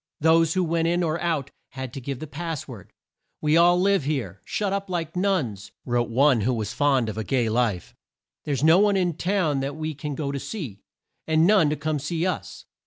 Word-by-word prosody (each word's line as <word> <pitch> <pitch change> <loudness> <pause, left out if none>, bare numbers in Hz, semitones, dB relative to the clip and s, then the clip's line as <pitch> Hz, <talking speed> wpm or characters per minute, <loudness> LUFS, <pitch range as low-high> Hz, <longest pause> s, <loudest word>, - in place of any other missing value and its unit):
Those 165 +1 +3
who 185 - +2
went 165 0 0
in 175 +1 +1
or 160 0 -1
out 155 -5 -1 0.2
had 130 -2 -6
to 135 - -6
give 135 +1 -4
the 155 - -6
pass 155 +1 -5
word. 115 -9 -11 0.5
"We 150 0 +2
all 175 +1 +5
live 195 -3 +2
here, 125 - -3
shut 200 -2 -1
up 200 -1 -3
like 170 -2 -3
nuns," 165 - -1
wrote 120 -2 0
one 130 0 +3
who 125 +4 +1
was 110 -2 -3
fond 135 -5 +2
of 110 0 -4
a - - -2
gay 120 -1 0
life, 110 -5 -1 0.5
"There's 140 -2 -2
no 160 +3 +6
one 205 -1 +3
in 180 -2 +1
town 175 -4 0
that 140 +1 -3
we 155 0 -4
can 145 0 -5
go 140 -2 -3
to 140 - -3
see, 135 - -6 0.5
and 160 0 +3
none 190 -6 +5
to 150 - 0
come 155 +1 -2
and - - -6
see 165 +4 -2
us." 110 - -4
150 Hz, 220 wpm, -24 LUFS, 130-170 Hz, 0.5 s, no